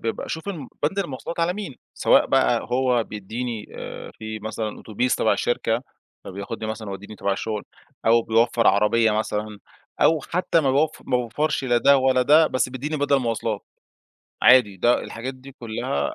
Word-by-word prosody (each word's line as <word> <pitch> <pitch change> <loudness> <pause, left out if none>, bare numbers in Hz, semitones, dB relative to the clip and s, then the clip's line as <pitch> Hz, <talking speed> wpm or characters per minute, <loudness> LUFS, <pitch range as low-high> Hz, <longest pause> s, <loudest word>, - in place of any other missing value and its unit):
بابقى 115 - -3
أشوف 160 +4 -5
ال 160 -10 -5
بند 160 +7 0
المواصلات 170 -1 -4
على 170 +1 +2
مين؟ 190 -9 -6 0.2
سواء - - +4
بقى - - +3
هو 125 -2 +2
بيديني، 110 +2 -5
آآ، - - -7
في 110 0 -6
مثلًا 110 0 -4
أوتوبيس 125 +4 -1
تبع - - +2
الشركة، - - 0 0.4
فبياخدني 100 +3 -6
مثلًا 110 -2 -6
يوديني 100 +2 -8
تبع 100 - -1
الشغل، 105 +1 -3 0.4
أو 115 +1 +5
بيوفّر 115 +1 +2
عربية 105 +3 +4
مثلًا، 105 0 -2 0.4
أو 160 -1 +4
حتى 170 +1 0
ما 140 -3 +1
بيوف 150 +3 +1
ما 125 - +2
بيوفرش 135 +5 -1
لا 120 -2 +3
ده 140 +4 +5
ولا 130 -1 +3
ده، 155 +5 +6
بس 130 -2 0
بيديني 135 +5 -4
بدَل 145 -1 +2
مواصلات. 115 -4 -2 0.8
عادي 125 -6 +6
ده 120 +6 +3
الحاجات 130 +3 -6
دي 130 +1 -13
كلها 110 - -3
120 Hz, 165 wpm, -23 LUFS, 110-140 Hz, 0.8 s, ده